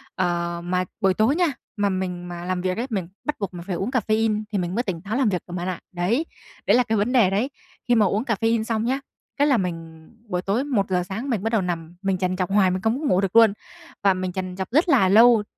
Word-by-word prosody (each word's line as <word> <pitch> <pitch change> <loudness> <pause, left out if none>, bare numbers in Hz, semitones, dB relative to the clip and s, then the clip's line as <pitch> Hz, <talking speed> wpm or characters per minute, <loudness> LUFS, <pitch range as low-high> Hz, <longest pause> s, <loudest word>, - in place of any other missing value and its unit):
ờ, 170 -2 -1
mà 180 +1 0 0.2
buổi 190 -1 +4
tối 220 +9 +2
nha, 350 -1 +3 0.3
mà 205 -1 +2
mình 180 -2 -3
mà 175 0 -7
làm 185 -1 -1
việc 185 +1 -1
ấy, 245 +3 -2
mình 190 -6 -2 0.2
bắt 300 - -1
buộc 200 -2 -3
mình 170 -1 -7
phải 180 - -2
uống 195 +7 -2
caffeine 220 -3 +1
thì 205 - 0
mình 180 +1 -2
mới 240 - +1
tỉnh 175 -6 -4
táo 205 +4 -4
làm 255 -6 +3
việc 180 -3 -1
được 175 - -8
bạn 180 0 -3
ạ. 180 -2 -3
Đấy, 200 - 0 0.4
đấy - - +5
là 250 - +4
cái 220 -1 0
vấn 210 +5 +1
đề 230 -8 +5
đấy. 210 +8 0 0.4
Khi 240 - +4
mà 215 -2 +4
uống 205 +5 0
caffeine 225 -1 +1
xong 225 0 -1
nhá, 265 +3 0 0.4
cái 290 +1 +3
là 265 -5 +4
mình 165 -3 -5 0.2
buổi 180 -2 -2
tối 205 +8 0
1:00 195 -9 0
sáng 220 +9 -5
mình 215 -5 -1
bắt 225 - 0
đầu 220 -4 +2
nằm, 170 -1 -4
mình 195 -1 0
trằn 185 0 -1
trọc 185 0 -2
hoài 195 -3 +4
mình 185 +1 -2
không 225 +6 0
có 310 - -4
ngủ 185 +1 +3
được 195 +2 -2
luôn 225 -3 +7 0.5
và 195 -1 +5
mình 185 0 -3
trằn 185 0 -4
trọc 190 +3 -4
rất 315 +6 +3
là 195 -10 +5
lâu 225 +1 +6
195 Hz, 265 wpm, -23 LUFS, 180-225 Hz, 0.5 s, luôn